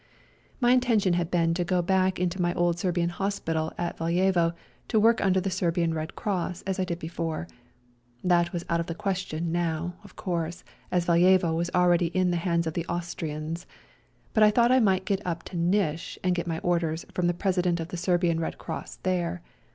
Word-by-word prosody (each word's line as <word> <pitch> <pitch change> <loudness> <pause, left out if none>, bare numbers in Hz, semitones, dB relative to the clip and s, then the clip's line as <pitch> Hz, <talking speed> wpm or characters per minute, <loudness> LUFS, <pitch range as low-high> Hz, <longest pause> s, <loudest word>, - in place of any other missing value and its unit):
My 245 -2 +4
intention 230 -7 +3
had 170 -1 0
been 165 -2 +2
to 175 +1 0
go 180 0 +1
back 190 +1 +2
into 180 +1 -1
my 175 +1 +1
old 175 0 +1
Serbian 175 -2 0
hospital 170 -4 -2
at 175 0 -3
Valjevo 170 0 +2 0.3
ta 220 - +1
work 225 +1 +4
under 190 -1 +3
the 190 +1 -2
Serbian 170 -2 0
Red 155 0 -4
Cross 185 -3 -2
as 190 0 -2
I 185 - +1
did 170 -2 -3
before; 165 0 -4 0.8
that 175 -1 +3
was 175 -2 -4
out 170 0 +1
of 170 - -2
the 165 - -4
question 185 -4 -2
now, 170 0 -1
of 205 - -15
course, 170 -2 -3 0.3
as 180 -1 +1
Valjevo 175 0 +4
was 170 +1 -1
already 175 -1 +4
in 180 +1 +1
the 175 - +1
hands 170 -1 0
of 160 - -2
the 170 0 -3
Austrians, 165 -1 -4 0.7
but 215 - +3
I 210 - +8
thought 235 +3 +4
I 260 - +6
might 190 -4 +2
get 200 -1 0
up 170 -2 -3
to - - -9
Nish 170 -2 0
and 180 -1 +2
get 175 -1 -2
my 165 -1 -1
orders 170 -2 0
from 180 -1 +1
the 175 - +1
President 180 -2 +1
of 165 +1 -5
the - - -5
Serbian 175 -2 +1
Red 165 - -3
Cross - - -6
there. 180 -2 -1
175 Hz, 200 wpm, -27 LUFS, 170-185 Hz, 0.8 s, I